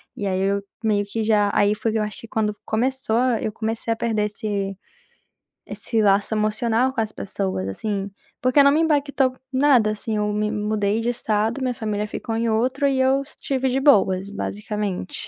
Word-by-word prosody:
E 205 Hz, -, -3 dB
aí, 185 Hz, -1 st, 0 dB
eu 200 Hz, +1 st, +1 dB, 0.2 s
meio 210 Hz, -2 st, +2 dB
que 220 Hz, +2 st, -3 dB
já 210 Hz, -2 st, +3 dB
aí 205 Hz, +1 st, +3 dB
foi 220 Hz, +1 st, -1 dB
que -, -, +1 dB
eu -, -, +1 dB
acho 210 Hz, +4 st, -6 dB
que 230 Hz, -, -11 dB
quando 210 Hz, -1 st, -1 dB
começou 245 Hz, 0 st, 0 dB, 0.2 s
eu 215 Hz, -, -2 dB
comecei 225 Hz, +1 st, -3 dB
a -, -, +2 dB
perder 220 Hz, -2 st, 0 dB
esse, 205 Hz, -2 st, -3 dB, 0.9 s
esse 225 Hz, -2 st, -1 dB
laço 200 Hz, +1 st, +3 dB
emocional 225 Hz, +4 st, +1 dB
com 230 Hz, -, 0 dB
as 215 Hz, -1 st, -3 dB
pessoas, 190 Hz, -, -3 dB
assim, 200 Hz, -, -3 dB, 0.3 s
porque 255 Hz, +3 st, +5 dB
não 280 Hz, -, +6 dB
me 310 Hz, +3 st, +3 dB
impactou 280 Hz, -4 st, +2 dB, 0.2 s
em 260 Hz, -, 0 dB
nada, 250 Hz, -7 st, +4 dB
assim. 215 Hz, +1 st, -3 dB
Eu 210 Hz, 0 st, 0 dB
me 210 Hz, 0 st, 0 dB
mudei 210 Hz, 0 st, 0 dB
de 235 Hz, -, 0 dB
estado, 225 Hz, +1 st, 0 dB
minha 255 Hz, -1 st, 0 dB
família 210 Hz, -2 st, -2 dB
ficou 225 Hz, +1 st, -4 dB
em 230 Hz, 0 st, 0 dB
outro 260 Hz, +6 st, +1 dB
e 265 Hz, -1 st, +1 dB
eu 265 Hz, +1 st, +3 dB
estive 265 Hz, -2 st, -2 dB
de 260 Hz, -, +1 dB
boas, 200 Hz, -8 st, +3 dB
basicamente, 205 Hz, -2 st, -4 dB
220 Hz, 195 wpm, -23 LUFS, 205-255 Hz, 0.9 s, não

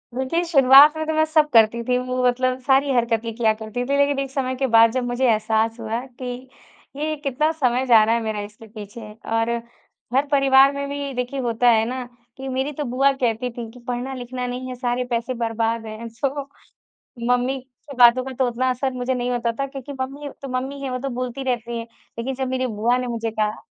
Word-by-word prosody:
देखिए, 265 Hz, +7 st, 0 dB
शुरुआत 285 Hz, -1 st, +7 dB
में 315 Hz, -, -2 dB
तो 315 Hz, -, 0 dB
मैं 315 Hz, 0 st, +3 dB
सब 310 Hz, -1 st, +2 dB
करती 230 Hz, +1 st, +5 dB
थी। 250 Hz, -, +2 dB
वो 255 Hz, 0 st, -2 dB
मतलब 255 Hz, +1 st, 0 dB
सारी 270 Hz, +1 st, +3 dB
हरकतें 230 Hz, -1 st, 0 dB
किया 225 Hz, -2 st, +2 dB
करती 220 Hz, +3 st, -5 dB
थी। 280 Hz, +1 st, 0 dB
लेकिन 285 Hz, 0 st, +2 dB
एक 275 Hz, -1 st, -3 dB
समय 260 Hz, -2 st, -2 dB
के 265 Hz, +1 st, 0 dB
बाद 230 Hz, -1 st, +6 dB
जब 255 Hz, 0 st, -1 dB
मुझे 245 Hz, +2 st, 0 dB
एहसास 220 Hz, +1 st, 0 dB
हुआ 225 Hz, +1 st, -3 dB, 0.2 s
कि -, -, -4 dB, 0.7 s
ये 310 Hz, +2 st, -2 dB
कितना 285 Hz, +4 st, +1 dB
समय 260 Hz, -4 st, 0 dB
जा 225 Hz, -3 st, +7 dB
रहा 225 Hz, +2 st, +2 dB
है 235 Hz, -, -1 dB
मेरा 220 Hz, -1 st, -3 dB
इसके 210 Hz, +2 st, -11 dB
पीछे। 210 Hz, 0 st, -10 dB
और 225 Hz, +1 st, 0 dB, 0.6 s
घर-परिवार 275 Hz, 0 st, +5 dB
में 280 Hz, 0 st, -3 dB
भी 280 Hz, -1 st, -4 dB
देखिए 250 Hz, +2 st, -3 dB
होता 240 Hz, -1 st, +2 dB
है 225 Hz, -1 st, +4 dB
ना 255 Hz, 0 st, -4 dB, 0.3 s
कि 270 Hz, -, -7 dB
मेरी 265 Hz, +3 st, -1 dB
तो 295 Hz, -, -4 dB
बुआ 275 Hz, +1 st, +4 dB
कहती 250 Hz, -2 st, -1 dB
थी 230 Hz, -2 st, -5 dB
कि 250 Hz, -, -14 dB
पढ़ना 250 Hz, +2 st, -3 dB
लिखना 250 Hz, 0 st, -5 dB
नहीं 250 Hz, +1 st, -5 dB
है 255 Hz, -, -5 dB
सारे 245 Hz, 0 st, -1 dB
पैसे 240 Hz, +1 st, -2 dB
बर्बाद 230 Hz, -1 st, -1 dB
है। 220 Hz, +2 st, -7 dB
सो 275 Hz, +4 st, -3 dB, 0.8 s
मम्मी 250 Hz, +2 st, +1 dB, 0.3 s
की 275 Hz, -, -9 dB
बातों 245 Hz, +1 st, +6 dB
का 265 Hz, -, -6 dB
तो 260 Hz, -, +3 dB
उतना 250 Hz, +2 st, 0 dB
असर 260 Hz, +1 st, -1 dB
मुझे 250 Hz, +1 st, -2 dB
नहीं 250 Hz, 0 st, -2 dB
होता 235 Hz, -1 st, 0 dB
था 275 Hz, -, +1 dB
क्योंकि 275 Hz, 0 st, -8 dB
मम्मी 280 Hz, +2 st, -5 dB
तो 275 Hz, -, -6 dB
मम्मी 275 Hz, +2 st, -6 dB
है 270 Hz, -, -3 dB
वो 255 Hz, -, -2 dB
तो 275 Hz, +1 st, -3 dB
बोलती 255 Hz, +2 st, -4 dB
रहती 235 Hz, -2 st, -2 dB
हैं। 230 Hz, -, -7 dB, 0.3 s
लेकिन 260 Hz, +3 st, -2 dB
जब 265 Hz, 0 st, -2 dB
मेरी 260 Hz, 0 st, -1 dB
बुआ 230 Hz, +2 st, +1 dB
ने 250 Hz, 0 st, -3 dB
मुझे 230 Hz, -1 st, -3 dB
कहा 215 Hz, -1 st, -2 dB
250 Hz, 215 wpm, -22 LUFS, 230-270 Hz, 0.8 s, शुरुआत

